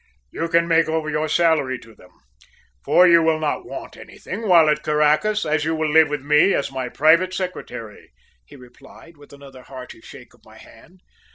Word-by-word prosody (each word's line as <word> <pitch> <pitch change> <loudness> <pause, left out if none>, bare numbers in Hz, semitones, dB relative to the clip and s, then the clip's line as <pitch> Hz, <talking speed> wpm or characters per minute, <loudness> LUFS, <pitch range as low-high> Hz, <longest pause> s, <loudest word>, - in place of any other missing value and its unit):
"You 165 - -4
can 170 0 +1
make 165 -1 +2
over 160 -1 -3
your 155 0 -2
salary 155 -6 +1
to 115 -2 -17
them, 90 - -20 0.7
for 180 - +4
you 170 -1 +5
will 160 -1 +1
not 155 -1 -3
want - - -9
anything 215 +4 -9
while 170 -4 +5
at 150 0 0
Caracas, 150 +8 0
as 155 -1 -1
you 160 +1 -2
will 155 -1 -2
live 160 -1 +4
with 145 -2 -5
me 150 +6 +3
as 140 - -3
my 130 -2 -5
private 170 +7 +2
secretary," 125 - -8 0.3
he - - -17
replied, 135 +6 -17
with 145 -1 -19
another 140 -2 -14
hearty 125 -3 -12
shake - - -15
of - - -27
my - - -18
hand. 170 +11 -19
155 Hz, 190 wpm, -20 LUFS, 140-165 Hz, 0.7 s, you